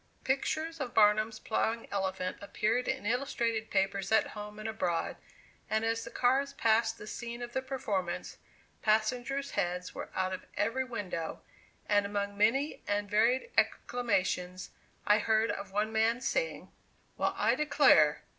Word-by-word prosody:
Pictures 310 +4 -1
of 255 -3 -4
Barnum's 215 +1 +4
plowing 225 +1 -1
elephant 190 -2 -2
appeared 220 +4 0
in - - -2
illustrated 230 -2 -1
papers 195 0 0
at 220 -1 +4
home 210 0 -8
and 215 +1 -5
abroad, 180 -6 -1 0.5
and 220 +1 +1
as 225 0 0
the - - -7
cars 270 +3 +1
passed 225 0 +2
the - - -9
scene 235 +2 -6
of 240 0 -7
the 265 - 0
performance, 200 -10 -3 0.4
passengers' 245 +6 +1
heads 180 -2 -2
were - - -6
out 185 0 0
of 185 - -6
every 230 +6 +1
window, 205 -10 -5 0.4
and 205 -1 +3
among 200 0 -2
many 235 +9 +2
and 205 0 -1
varied 240 - +2
exclamations, 185 -6 0 0.3
I 210 +1 +5
heard 220 +1 +2
of 200 0 -6
one 210 +2 0
man's 230 +4 +2
saying: - - -2 0.4
"Well, - - 0
I - - +3
declare! 225 - +4
220 Hz, 145 wpm, -31 LUFS, 200-245 Hz, 0.5 s, I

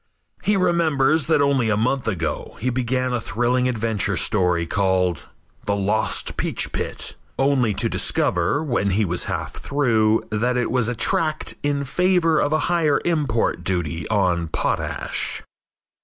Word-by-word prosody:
He 205 -1 +2
remembers 160 -5 +2
that 155 -3 +3
only 135 -5 +2
a 105 - +1
month 125 +3 0
ago 85 -7 -3
he 125 +2 -1
began 130 +1 -1
a 120 - -1
thrilling 125 +4 0
adventure 110 -4 -1
story 90 -5 +2
called 90 -2 0 0.4
"The 100 - 0
Lost 105 +2 0
Peach - - -1
Pit," - - -4 0.2
only 130 -6 +2
to - - +1
discover, 90 - 0
when 120 -9 0
he 105 +3 +1
was 90 -1 -1
half - - -4
through, 115 -6 +1
that 120 +4 0
it 120 - -1
was 125 -2 +2
a 125 - -2
tract 155 +5 0
in 145 -1 -1
favor 170 +1 +2
of 145 - +1
a 155 0 +2
higher 165 -4 +2
import 140 - 0
duty 85 -3 -2
on 90 -6 +1
potash. 80 - -2
120 Hz, 150 wpm, -22 LUFS, 100-145 Hz, 0.4 s, that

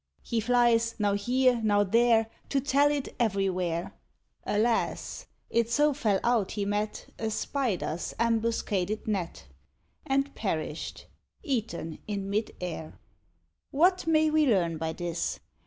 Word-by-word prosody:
He 230 - -1
flies 230 0 +3
now 205 -2 +1
here, 245 +4 +2
now 205 -1 +4
there, 225 +2 +4 0.2
To 275 - +2
tell 285 +1 +3
it 290 -2 -1
everywhere. 185 -6 0 0.5
Alas! 225 +3 0 0.2
it 230 0 +2
so 295 +4 +3
fell 215 -8 +1
out 235 -5 +1
he 205 -1 -2
met 210 +1 -3
A 220 - -1
spider's 215 - -2
ambuscaded 225 -3 0
net, 185 - -3 0.6
And 275 +1 +1
perished, 160 -6 -4 0.4
eaten 220 - -3
in 200 -2 -3
mid 215 +2 0
air. 160 -3 -6 0.7
What 355 +4 +3
may 310 -1 +4
we 310 -1 +3
learn 170 -8 +2
by 160 0 -2
this? 170 0 -3
220 Hz, 125 wpm, -28 LUFS, 195-245 Hz, 0.7 s, now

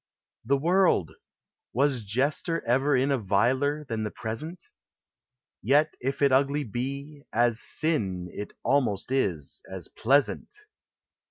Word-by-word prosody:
] - - -43
The 140 - +5
World! 170 - +3 0.6
Was 135 0 +2
jester 140 - 0
ever 135 +4 +3
in 135 +3 +2
A 135 - +2
viler 130 +9 +1
than 115 -5 -3
the 105 - -2
present? 150 - -6 1.0
Yet 150 +6 +3
if 135 +3 -2
it 140 - +5
ugly 140 +2 +3
be 140 +5 -5
— - - -59
as 120 -1 0
sin, 100 - -1
It 105 - -6
almost 125 -6 +1
is 90 - -1
— - - -17
as - - -7
pleasant 140 - +1
135 Hz, 140 wpm, -27 LUFS, 115-145 Hz, 1.0 s, The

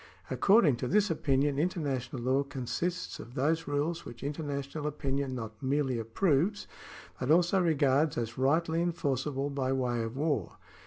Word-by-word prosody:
According 195 - +4
to 125 - -3
this 205 +5 +3
opinion 140 -2 +1
international 140 -8 -2
law 130 +2 +2
consists 145 +6 -3
of 120 +2 -10
those 160 +5 +1
rules 150 +4 -1
which 120 0 -10
international 145 0 -3
opinion 140 -2 -2
not 110 -2 -7
merely 135 -2 0
approves, 155 - +1 0.5
but 125 - -2
also 175 +4 +4
regards 145 -3 +2
as 120 0 -3
rightly 160 +5 +2
enforceable 145 -4 -1
by 135 -2 -1
way 125 -3 0
of 115 +3 -4
war. 145 - 0
140 Hz, 145 wpm, -30 LUFS, 130-160 Hz, 0.5 s, According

